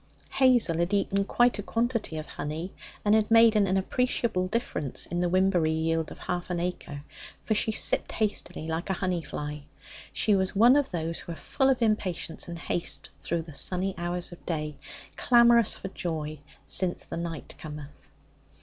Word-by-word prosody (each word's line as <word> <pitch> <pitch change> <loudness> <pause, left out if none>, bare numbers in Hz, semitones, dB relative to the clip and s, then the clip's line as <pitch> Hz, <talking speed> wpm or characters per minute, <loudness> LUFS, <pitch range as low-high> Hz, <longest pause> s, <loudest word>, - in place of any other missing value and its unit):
Hazel 245 -11 +4
had 175 +4 +1
eaten 200 0 +1
quite 240 +1 +2
a - - 0
quantity 230 -5 -1
of 155 - -5
honey, 155 +5 -5 0.3
and 205 - +4
had 215 -1 +3
made 225 -1 +6
an 195 -2 +3
appreciable 210 -2 0
difference 185 - -2
in 175 - -3
the 175 0 +1
wimberry 185 -3 +3
yield 160 0 0
of - - -10
half 180 0 -4
an 175 -1 -1
acre, 170 -5 -4 0.4
for 220 - 0
she 215 +1 +1
sipped - - +2
hastily 205 -6 -1
like 160 +3 -3
a - - +2
honey 180 -2 -1
fly. 150 -1 -5 0.5
She 210 - +2
was 190 0 0
one 235 +6 +7
of 290 -2 +2
those 165 -1 -3
who - - -8
are - - -8
full 265 - 0
of 255 -3 +2
impatience 190 -7 -1
and 170 0 -6
haste 170 +1 -3
through 170 -1 -2
the 160 -1 -12
sunny 185 +6 -1
hours 175 +1 -2
of 175 - -12
day, 150 -3 -3 0.4
clamorous 235 -2 +5
for 190 - -6
joy, 155 -5 -4 0.3
since 180 -1 +2
the - - -6
night 165 -2 -5
cometh. 150 -1 -10
180 Hz, 175 wpm, -27 LUFS, 165-215 Hz, 0.5 s, one